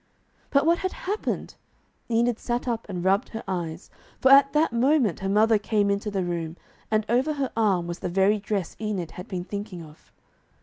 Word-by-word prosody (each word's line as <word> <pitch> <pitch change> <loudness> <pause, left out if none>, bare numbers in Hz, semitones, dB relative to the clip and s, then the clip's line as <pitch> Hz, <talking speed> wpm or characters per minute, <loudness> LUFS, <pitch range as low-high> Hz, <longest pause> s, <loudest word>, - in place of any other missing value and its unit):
But 280 +1 +3
what 335 +1 +3
had 375 - -2
happened? 410 +3 -3 0.6
Enid 235 0 +1
sat 240 +1 -2
up 230 -2 -2
and 180 -3 -4
rubbed 195 +5 +2
her 225 - -6
eyes. 170 -2 -4 0.3
For 265 - +4
at 275 0 +7
that 305 -4 +2
moment 250 - +2
her 195 - -2
mother 215 +2 +4
came 205 -1 +1
into 200 +1 -1
the 195 -2 -1
room, 170 -1 -3 0.3
and 215 -1 +1
over 255 +7 +2
her 280 -3 -2
arm 200 -6 +2
was 175 0 -5
the - - -3
very 195 +4 +3
dress 200 -3 -3
Enid 200 -6 -3
had 180 - -9
been 180 -3 -4
thinking 200 -2 -6
of. 155 0 -17
210 Hz, 190 wpm, -25 LUFS, 185-240 Hz, 0.6 s, at